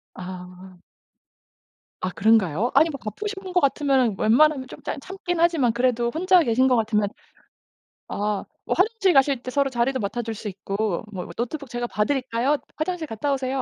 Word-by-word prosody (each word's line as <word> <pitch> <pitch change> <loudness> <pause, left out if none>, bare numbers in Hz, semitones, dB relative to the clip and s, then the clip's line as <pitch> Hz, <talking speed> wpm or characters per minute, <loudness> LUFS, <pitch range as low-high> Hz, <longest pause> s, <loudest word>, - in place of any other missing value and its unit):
아. 180 0 -10 1.2
아 - - +1
그런가요? 215 0 +2
아니 320 +1 +5
뭐 275 - -6
바쁘신 405 - -5
분인 375 -2 -8
것 360 - +5
같으면은 270 - +2
웬만하면 270 +4 +4
좀 - - -12
짬 - - -4
참긴 355 +1 -4
하지만 325 -9 +3
그래도 240 -1 +1
혼자 365 +2 +4
계신 255 -1 +2
것 255 - +4
같으면 215 -2 +1 1.0
아 205 0 -2 0.2
뭐 - - 0
화장실 395 -1 +3
가실 270 -3 +3
때 255 - -5
서로 280 0 +1
자리도 255 +2 0
맡아줄 225 +2 -3
수 215 - -7
있고 195 0 -2
뭐 180 -3 -6
"노트북 265 +3 -4
제가 240 +1 -3
봐 210 -2 0
드릴까요? 260 +1 0 0.2
화장실 320 0 -2
갔다 250 +5 -1
오세요." 265 0 -1
250 Hz, 350 characters per minute, -24 LUFS, 215-295 Hz, 1.2 s, 아니